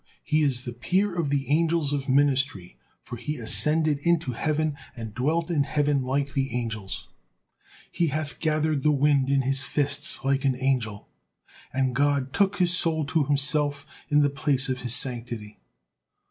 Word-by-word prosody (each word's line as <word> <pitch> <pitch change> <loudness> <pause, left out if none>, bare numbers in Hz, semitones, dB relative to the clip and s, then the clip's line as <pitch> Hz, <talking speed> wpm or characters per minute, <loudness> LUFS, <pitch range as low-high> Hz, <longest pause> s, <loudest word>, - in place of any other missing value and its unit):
He 155 +1 +1
is 130 -4 0
the 120 - -5
peer 185 - 0
of 170 -4 -2
the 140 -1 -1
angels 160 -2 +1
of 140 -1 -3
ministry, 135 -8 +1 0.3
for 120 - -8
he 150 +6 -4
ascended 150 +5 +2
into 165 -3 +1
heaven 155 +4 -1 0.2
and 115 -3 -7
dwelt 160 +8 -1
in 155 -4 +1
heaven 145 0 0
like 135 +2 -2
the 135 -3 -2
angels, 110 -5 -4 0.8
'he 170 - 0
hath 150 0 -4
gathered 155 -2 0
the 150 - +2
wind 140 -1 +2
in 140 -1 +2
his 135 +1 +1
fists' 145 +2 -1
like 135 0 +1
an 135 -2 +1
angel, 125 -6 -1 0.6
and 130 -1 0
God 140 0 0
took 200 0 +2
his 180 -2 +2
soul 160 -4 0
to 155 0 0
Himself 145 0 0 0.2
in 150 -1 +4
the 145 - +1
place 135 -1 +1
of 130 -1 -2
His 125 -1 +7
sanctity. 120 -4 0
140 Hz, 165 wpm, -25 LUFS, 130-155 Hz, 0.8 s, His